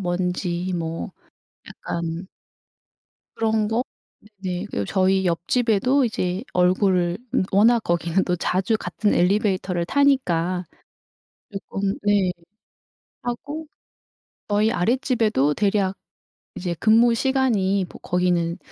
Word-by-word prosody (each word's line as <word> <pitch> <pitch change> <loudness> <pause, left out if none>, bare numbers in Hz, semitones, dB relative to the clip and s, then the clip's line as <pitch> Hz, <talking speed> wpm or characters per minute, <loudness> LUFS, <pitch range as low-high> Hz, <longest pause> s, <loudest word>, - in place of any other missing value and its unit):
뭔지 180 0 -2
뭐 165 -1 -4 0.6
약간 170 +2 -5 1.1
그런 220 -1 +1
거. 225 +3 0 0.6
네네. 185 0 -3
그리고 100 - -2
저희 190 - +2
옆집에도 230 +8 +2
이제 185 -3 -2
얼굴을 180 -1 +2 0.2
음 - - +3
워낙 225 +5 +5
거기는 170 +2 +1
또 180 - 0
자주 185 +5 0
같은 205 +2 -1
엘리베이터를 185 -2 +1
타니까 185 -10 +1 0.9
쪼끔 195 0 -3
네 205 -3 +2 0.9
하고 285 +6 -5 0.8
저희 210 +1 +2
아랫집에도 220 - +1
대략 195 -2 +1 0.6
이제 175 -1 -3
근무시간이 230 -3 +3
뭐 - - -12
거기는 175 -1 0
190 Hz, 220 characters per minute, -23 LUFS, 180-220 Hz, 1.1 s, 워낙